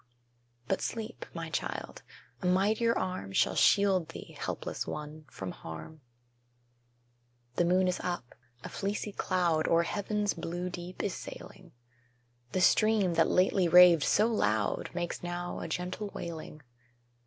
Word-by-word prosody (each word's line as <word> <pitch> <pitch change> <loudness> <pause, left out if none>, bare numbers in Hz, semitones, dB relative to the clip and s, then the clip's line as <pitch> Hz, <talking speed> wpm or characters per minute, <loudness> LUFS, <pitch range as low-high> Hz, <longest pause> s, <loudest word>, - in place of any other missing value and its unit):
But - - 0
sleep, 225 0 -5
my 165 -1 -6
child; - - -4 0.4
a - - -1
mightier 210 +5 +2
Arm 185 - -3
Shall - - +3
shield 195 -4 +4
thee - - -10
(helpless - - -4
one!) 150 +1 -6
from 95 -7 -6
harm. 80 - -9 1.6
The 175 - +3
moon 185 +2 +3
is 180 - 0
up; 175 -9 -4 0.3
a - - -6
fleecy 205 +1 -3
cloud 175 -5 +1
O'er 165 0 +4
heaven's 205 +2 -1
blue 175 +2 -4
deep 180 +1 -6
is 200 - -1
sailing; - - -10 0.8
The 185 - 0
stream, 215 -1 +4
that 165 0 +3
lately 185 0 +3
raved 175 -1 +8
so 210 +8 +3
loud, 110 - 0
Makes 175 -1 -3
now 175 0 -4
a - - -5
gentle 180 +5 -3
wailing. 155 -2 -7
180 Hz, 135 wpm, -30 LUFS, 165-195 Hz, 1.6 s, raved